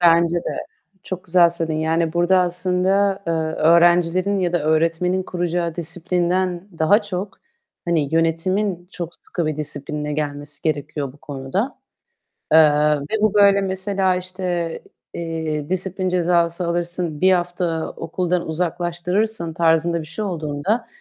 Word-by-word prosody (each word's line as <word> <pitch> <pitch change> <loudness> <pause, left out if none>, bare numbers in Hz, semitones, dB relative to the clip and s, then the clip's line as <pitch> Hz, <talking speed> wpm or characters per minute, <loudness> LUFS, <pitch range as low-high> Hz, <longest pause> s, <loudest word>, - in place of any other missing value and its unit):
Bence 170 0 +4
de. 170 - -3 0.4
Çok 185 -1 -6
güzel 175 -1 +5
söyledin. 165 -2 -2
Yani, 160 0 0
burada 175 +2 +3
aslında, 185 +2 +1
eee, 165 - 0 0.3
öğrencilerin 175 +4 +4
ya 175 -2 0
da 175 -3 +1
öğretmenin 165 +4 +1
kuracağı 175 -2 -2
disiplinden 175 +2 -1
daha 200 +8 +4
çok, 195 -1 -5 0.5
hani, 160 -4 0
yönetimin 175 +3 0
çok 170 -2 -6
sıkı 170 - -4
bir 155 -1 -2
disiplinle 150 0 -4
gelmesi 145 -1 -2
gerekiyor 150 -2 -2
bu 145 - -20
konuda. 145 - -4 0.8
Eee, 155 -1 +7 0.3
ve 205 +10 -3
bu 215 -1 +3
böyle, 200 -1 +5
mesela, 190 0 0
işte, 180 -2 -3 0.4
eee, 160 -2 -3
"Disiplin 185 0 -1
cezası 175 -1 +1
alırsın, 170 -2 -2
1 190 0 +5
hafta 175 -2 -1
okuldan 175 +1 -2
uzaklaştırırsın." 175 +3 -1
tarzında 165 0 +2
bir 155 - -10
şey 215 +6 -4
olduğunda 175 +6 -2
175 Hz, 130 wpm, -21 LUFS, 160-185 Hz, 0.8 s, Eee